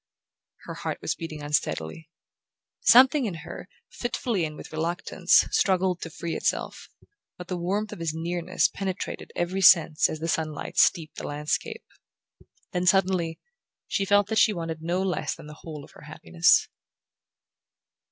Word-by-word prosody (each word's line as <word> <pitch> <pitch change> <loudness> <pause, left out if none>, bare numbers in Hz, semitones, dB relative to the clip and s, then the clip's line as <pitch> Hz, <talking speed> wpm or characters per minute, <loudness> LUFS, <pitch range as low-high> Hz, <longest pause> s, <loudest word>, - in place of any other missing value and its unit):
Her - - -6
heart - - -4
was - - -2
beating 155 -3 -7
unsteadily. 145 - -2 0.7
Something 265 - +6
in 185 - -4
her, 180 - -9 0.2
fitfully 235 -6 -2
and 155 -1 -7
with - - -10
reluctance, 170 +3 +2
struggled 185 -2 +1
to 165 - -5
free 165 +1 -5
itself, - - -2 0.5
but 180 -1 -10
the 180 - -2
warmth 200 +5 -2
of - - -9
his 165 -2 -1
nearness 170 +3 0
penetrated 190 -1 -5
every 185 +3 -1
sense 165 -4 +6
as 155 - -5
the 165 - -3
sunlight 155 -2 -3
steeped 165 -3 +2
the - - -5
landscape. 150 +1 -3 0.9
Then, 180 0 -1
suddenly, 180 -3 +2 0.5
she 195 - 0
felt 205 +1 +3
that 220 0 +2
she 215 - +5
wanted 165 -3 -5
no 175 +3 -1
less 190 -2 -2
than 165 - -13
the 150 +1 -12
whole 155 -3 -8
of - - -15
her - - -16
happiness. 80 +1 +2
175 Hz, 150 wpm, -26 LUFS, 160-190 Hz, 0.9 s, Something